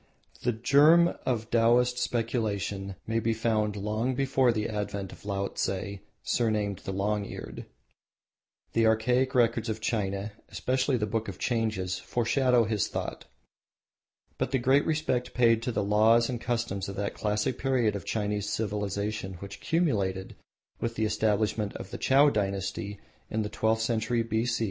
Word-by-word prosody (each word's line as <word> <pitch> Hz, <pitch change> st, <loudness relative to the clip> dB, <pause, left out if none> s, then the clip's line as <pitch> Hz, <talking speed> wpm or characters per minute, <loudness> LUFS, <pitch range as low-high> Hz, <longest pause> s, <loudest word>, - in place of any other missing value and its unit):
The 120 Hz, -, +1 dB
germ 150 Hz, +9 st, +5 dB
of 115 Hz, -3 st, -1 dB
Taoist 120 Hz, +2 st, +3 dB
speculation 105 Hz, -5 st, -2 dB
may 115 Hz, 0 st, 0 dB
be 115 Hz, 0 st, 0 dB
found 110 Hz, -2 st, 0 dB
long 110 Hz, +5 st, -1 dB
before 135 Hz, -1 st, +3 dB
the 110 Hz, -2 st, -1 dB
advent 100 Hz, -2 st, -4 dB
of -, -, -14 dB
Laotse, 100 Hz, 0 st, -2 dB, 0.2 s
surnamed 105 Hz, -5 st, 0 dB
the -, -, -5 dB
Long 100 Hz, +2 st, 0 dB
Eared. -, -, -8 dB, 1.1 s
The 115 Hz, -1 st, +3 dB
archaic 125 Hz, +4 st, +2 dB
records 115 Hz, -1 st, +2 dB
of 110 Hz, 0 st, -2 dB
China, 105 Hz, -2 st, -2 dB, 0.2 s
especially 130 Hz, +1 st, 0 dB
the 105 Hz, -, 0 dB
Book 110 Hz, +1 st, -2 dB
of 95 Hz, -2 st, -6 dB
Changes, 110 Hz, -7 st, -1 dB
foreshadow 125 Hz, +1 st, +2 dB
his 110 Hz, -2 st, 0 dB
thought. -, -, -5 dB, 1.1 s
But -, -, 0 dB
the 135 Hz, -, +1 dB
great 130 Hz, +3 st, +3 dB
respect 130 Hz, -6 st, -1 dB
paid 115 Hz, -2 st, +4 dB
to 125 Hz, -, -2 dB
the 105 Hz, -3 st, -1 dB
laws 110 Hz, +4 st, +4 dB
and 120 Hz, -2 st, -4 dB
customs 115 Hz, -5 st, -2 dB
of 100 Hz, -, -6 dB
that 100 Hz, 0 st, -2 dB
classic 105 Hz, +4 st, -1 dB
period 125 Hz, -6 st, +1 dB
of 100 Hz, -, -4 dB
Chinese 105 Hz, -1 st, -2 dB
civilisation 105 Hz, -2 st, -2 dB
which 100 Hz, +3 st, -9 dB
culminated 105 Hz, -, 0 dB, 0.4 s
with 115 Hz, 0 st, -2 dB
the 110 Hz, -, 0 dB
establishment 105 Hz, -1 st, 0 dB
of 95 Hz, -, -8 dB
the -, -, -6 dB
Chow 140 Hz, +2 st, +5 dB
dynasty 100 Hz, -1 st, -2 dB, 0.3 s
in 110 Hz, 0 st, -1 dB
the 105 Hz, -, -4 dB
sixteenth 110 Hz, +1 st, +1 dB
century 115 Hz, +1 st, 0 dB
B.C. 115 Hz, +1 st, 0 dB
110 Hz, 150 wpm, -28 LUFS, 100-120 Hz, 1.1 s, germ